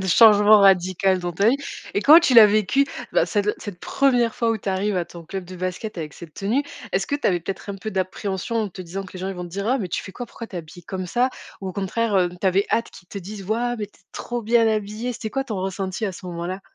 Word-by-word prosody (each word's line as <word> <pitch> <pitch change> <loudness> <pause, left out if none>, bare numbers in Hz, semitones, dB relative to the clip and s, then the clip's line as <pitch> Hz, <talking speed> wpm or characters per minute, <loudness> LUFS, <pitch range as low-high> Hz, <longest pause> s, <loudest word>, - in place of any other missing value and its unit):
De 190 - -3
changement 210 +2 +7
radical 185 0 +4
dans 175 -1 -4
ta 200 +6 +3
vie, 265 - +2 0.4
et 200 - +2
comment 300 +8 +9
tu 335 - +2
l'as 225 -2 +11
vécu, 215 +7 +2 0.3
bah, - - +3
cette 210 0 0
cette 200 -4 -7
1re 245 -4 +2
fois 230 -1 +1
où 225 - +1
tu 200 - -6
arrives 195 +1 0
à 175 - 0
ton 170 0 -11
club 190 +2 -5
de 185 +1 -10
basket 185 +3 -4
avec 155 -2 -5
cette 170 -3 -11
tenue? 220 +8 0 0.3
Est-ce - - 0
que 285 - -1
tu 285 - -1
avais, 180 -3 +2
peut-être, 190 +4 -6
un 200 - -3
peu 215 +3 -5
d'appréhension 190 +2 -2
en 220 -2 0
te 185 - -10
disant 185 +2 -5
que 190 - -12
les 185 - -8
gens 190 +1 -3
ils 195 - -4
vont 180 - -6
te - - -8
dire: 200 +3 -4
«Ah 260 +1 +2
mais 190 - -3
tu - - -2
fais 195 - -10
quoi? 245 - -6
Pourquoi 235 -1 -9
tu 190 - -9
es - - -1
habillé 170 +2 -11
comme 185 +1 -5
ça?» 245 +8 +2 0.3
ou 190 - -4
au - - -5
contraire, 205 +3 -1
heu, 180 -2 +3
tu - - 0
avais 190 +2 +3
hâte 230 - 0
qu'ils 180 - -15
te 200 - -6
disent: 200 +2 -8
«Waouh, 240 +4 -1
mais 210 - -3
tu 205 - -27
es - - -34
trop 240 0 -4
bien 230 +1 +3
habillé!». 215 +3 -1
C'était 220 -1 -6
quoi, 270 +5 -1
ton 215 -8 -4
ressenti 190 +2 -3
à 190 - -3
ce 180 - -11
moment-là? 175 +2 -4
200 Hz, 285 wpm, -23 LUFS, 185-225 Hz, 0.4 s, l'as